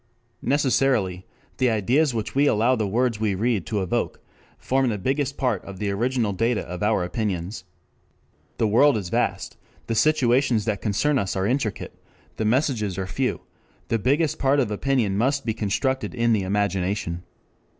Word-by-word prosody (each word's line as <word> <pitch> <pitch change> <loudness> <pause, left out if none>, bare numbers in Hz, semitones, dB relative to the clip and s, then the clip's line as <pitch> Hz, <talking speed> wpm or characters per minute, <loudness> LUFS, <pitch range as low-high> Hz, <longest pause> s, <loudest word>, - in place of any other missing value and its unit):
Necessarily 130 -9 +1 0.3
the 130 -1 +2
ideas 125 +8 +2
which 110 -2 -4
we 140 +2 +3
allow 120 +2 +3
the 110 -4 -1
words 115 +2 0
we 105 -3 0
read 110 -2 0
to 105 -3 -1
evoke 90 - -2 0.4
form 130 -1 +1
the 105 - -1
biggest 135 +7 -1
part 125 -8 0
of 100 -1 -9
the 100 +1 -2
original 115 0 0
data 115 +4 0
of 90 0 -7
our 105 -3 +2
opinions. 90 0 -3 0.9
The 110 - +2
world 120 +5 +4
is 95 -4 -4
vast, - - -1 0.3
the 115 - -2
situations 125 -3 +2
that 105 -3 -1
concern 130 +8 +1
us 100 -3 -2
are 95 0 0
intricate, 120 -2 -2 0.4
the 110 - -1
messages 110 -5 0
are 95 - -2
few, 125 +8 -2 0.5
the 115 - +1
biggest 145 +8 +1
part 140 +1 +3
of 125 -6 0
opinion 105 -3 0
must 135 +4 +1
be 110 - 0
constructed 130 +6 -1
in 115 -1 +2
the 105 - +2
imagination. 95 -2 -1
110 Hz, 165 wpm, -24 LUFS, 100-130 Hz, 0.9 s, world